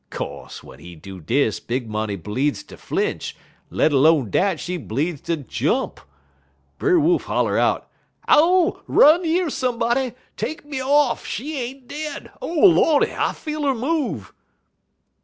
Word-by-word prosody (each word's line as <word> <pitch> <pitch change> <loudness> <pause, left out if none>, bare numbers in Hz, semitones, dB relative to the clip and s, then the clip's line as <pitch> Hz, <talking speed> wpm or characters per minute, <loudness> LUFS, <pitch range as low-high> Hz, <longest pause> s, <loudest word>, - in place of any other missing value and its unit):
Co'se, - - -7
w'en - - -14
he 85 0 -11
do 95 +4 -10
dis, 115 - 0
Big 125 0 -3
Money 110 -1 -3
bleedz 130 - -2
ter - - -12
flinch; - - -3 0.3
let 155 - +1
'lone 140 - +4
dat, 190 -4 +1
she 180 - -4
bleedz 145 +4 -3
ter 170 - -1
jump. 150 - -2 0.8
Brer 365 -3 +3
Wolf 335 +3 +2
holler - - 0
out: - - +1 0.4
"'Ow! 355 +4 +4
Run 320 +5 +6
yer 335 0 0
somebody! 250 0 0 0.2
Take 310 - -4
me 280 -3 -4
off! 275 -1 +2
She 290 +9 -4
ain't 255 +1 -7
dead! 300 0 -6
O - - -4
Lordy! 330 -3 +4
I - - 0
feel 305 -1 -5
'er 275 -2 +1
move!' 250 - -2
245 Hz, 145 wpm, -22 LUFS, -, 0.8 s, Run